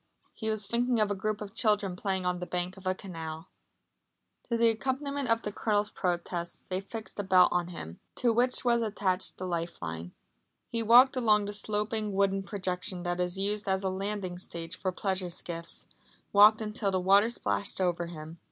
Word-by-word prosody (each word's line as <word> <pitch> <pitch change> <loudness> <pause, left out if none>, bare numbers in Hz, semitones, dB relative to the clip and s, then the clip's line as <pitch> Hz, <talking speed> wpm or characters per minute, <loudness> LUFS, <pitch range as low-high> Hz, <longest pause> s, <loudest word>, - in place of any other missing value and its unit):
He 220 -2 -4
was 215 -2 -1
thinking 240 +3 +1
of 210 -1 +2
a - - +2
group 210 +2 -2
of 205 -1 -7
children 210 -5 +2
playing 190 -1 -2
on 180 0 0
the 180 - -5
bank 180 +1 -2
of 190 -1 -9
a 185 - +1
canal. 165 -3 -7 1.0
To 235 - -1
the 230 0 +5
accompaniment 270 +3 -2
of 230 0 +2
the 210 - -3
Colonel's 210 0 0
protests 175 -1 -2
they 185 0 -2
fixed 220 +2 -8
a - - 0
belt 185 -1 +6
on 175 -1 0
him, 85 - -8 0.2
to 240 -2 +2
which 250 +2 +3
was 235 -1 +3
attached 195 -4 -1
the 185 - -5
life 170 -1 -3
line. 85 +1 -6 0.5
He 230 - -2
walked 245 +4 +7
along 215 -4 +3
the 205 - -4
sloping 210 0 -2
wooden 195 0 +2
projection 185 -2 -1
that 175 0 -2
is 180 +1 -1
used 205 +1 -1
as 190 0 0
a 190 - +1
landing 190 -1 -3
stage 170 -1 -6
for 185 0 -2
pleasure 190 -1 -1
skiffs, 170 -1 -7 0.5
walked 210 +2 +7
until 210 -1 -2
the 190 -1 +1
water 200 +4 +5
splashed 205 -4 -2
over 175 -2 0
him. 160 0 -9
195 Hz, 190 wpm, -29 LUFS, 180-215 Hz, 1.0 s, walked